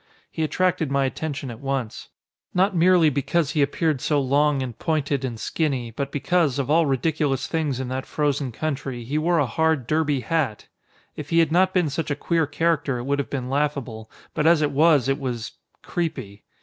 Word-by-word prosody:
He - - -4
attracted 180 0 +1
my 140 0 +1
attention 135 -1 -4
at 115 - -10
once. 135 -4 -4 0.5
Not 190 +2 +2
merely 170 -2 +5
because 145 +2 0
he 150 - +1
appeared 145 0 0
so 150 -2 +1
long 140 +1 +2
and 125 -3 -6
pointed 145 -4 -1
and 120 -4 -4
skinny, 130 -5 -2
but 140 +5 -4
because, 155 -2 +1
of 140 0 -1
all 165 0 +4
ridiculous 140 0 0
things 150 -6 -1
in 130 - -3
that 130 +1 -4
frozen 145 -3 -1
country, 135 -2 -4
he 140 +6 -1
wore 170 +2 +2
a 145 - +3
hard 160 +2 0
derby 150 -1 +1
hat! 135 -4 -1 0.5
If 150 -1 -7
he 165 - +1
had 165 -2 +4
not 185 +2 +4
been 180 -6 +1
such 160 +4 -3
a 145 - 0
queer 165 +1 0
character 160 -4 0
it 120 - -5
would 140 +2 -1
have 140 - -3
been 130 -3 -3
laughable, 135 -6 -2 0.2
but 150 - +1
as 165 -2 +5
it 145 - +1
was 150 -2 +4
it 135 +2 0
was 120 -4 -4 0.3
creepy. 130 - -4
145 Hz, 195 wpm, -23 LUFS, 130-160 Hz, 0.5 s, merely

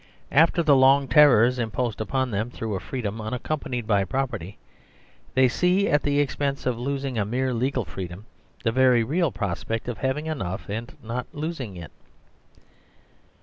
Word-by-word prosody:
After 165 +3 +4
the 145 -3 +5
long 135 +1 +5
terrors 125 -2 +5
imposed 115 -1 -2
upon 130 +2 -1
them 110 +3 -1
through 110 -3 -5
a 95 - -2
freedom 110 -4 -4
unac 110 +3 -4
companied 125 -6 -3
by 100 -3 +2
property, 110 -6 -3 0.8
they 130 0 +5
see, 180 +9 +2
at 145 - +3
the 145 0 +1
expense 140 -1 -1
of 125 -2 -1
losing 135 -1 -2
a - - +2
mere 125 +5 -1
legal 125 0 -1
freedom, 95 +2 -7 0.4
the 115 - +2
very 125 -1 +4
real 160 +5 0
prospect 100 +3 -3
of 120 - -4
having 135 +3 -1
enough 100 - -4
and 115 +4 -5
not 120 +2 -4
losing 145 - -5
it. 85 -4 -9
125 Hz, 160 wpm, -25 LUFS, 110-140 Hz, 0.8 s, the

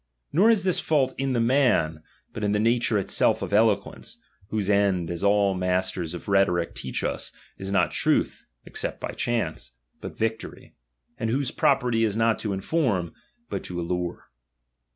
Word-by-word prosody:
Nor 195 +9 +5
is 220 -5 +3
this 185 -2 +3
fault 135 -4 +1
in 135 -1 0
the 120 - +1
man, 115 - +2 0.3
but 110 - -5
in 105 0 +1
the 105 - +1
nature 115 0 +2
itself 100 - +2
of - - -5
eloquence, 105 - +1 0.3
whose 105 -2 -2
end, 100 -4 +2
as 85 +2 -4
all 100 -1 +3
the 90 - -4
masters 90 -2 -1
of 85 - -9
rheto 100 -2 +3
ric 85 -1 -2
teach - - -4
us, - - -3 0.3
is 95 0 -5
not 95 -3 +2
truth - - 0 0.2
(except - - -5
by - - -4
chance), 110 - -2 0.3
but - - -8
victory; 110 0 -4 0.5
and 115 -2 -1
whose 130 +2 0
property 115 -2 +2
is 110 -1 0
not 115 -1 +2
to 110 - -3
iuform, 100 - -1 0.3
but - - -4
to 90 -1 -5
allure. 85 -4 -4
105 Hz, 175 wpm, -25 LUFS, 90-120 Hz, 0.5 s, Nor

